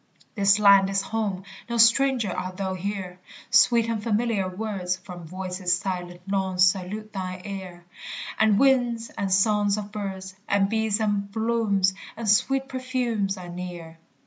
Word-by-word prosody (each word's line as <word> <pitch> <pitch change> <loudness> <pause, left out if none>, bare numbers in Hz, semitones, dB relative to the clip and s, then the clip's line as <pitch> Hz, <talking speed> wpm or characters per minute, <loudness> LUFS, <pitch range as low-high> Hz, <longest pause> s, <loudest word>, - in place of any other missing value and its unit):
This 200 -2 +4
land 200 -2 +6
is 195 0 0
home; 200 -3 -3 0.3
no 235 - -1
stranger 230 -1 +4
art 185 +1 -5
thou 190 -1 -2
here; 185 -1 -5 0.3
Sweet 235 -2 +5
and 225 -2 -2
familiar 215 -3 0
words 185 -2 -3
From 180 -3 -10
voices 185 0 -1
silent 180 -2 -5
long 190 -2 -1
salute 190 +3 +1
thine 185 -2 -5
ear; 185 -3 -7 0.5
And 220 -2 +4
winds 245 -3 +2
and 195 -1 -2
songs 205 +1 +3
of 210 -1 -6
birds, 190 -3 -5
And 200 -1 +2
bees 220 -1 +1
and 205 -2 -1
blooms 220 -4 +1 0.2
and 230 -1 -5
sweet 270 +6 +2
perfumes 250 -6 -2
are 180 -1 -9
near. 175 -2 -8
200 Hz, 145 wpm, -25 LUFS, 185-220 Hz, 0.5 s, land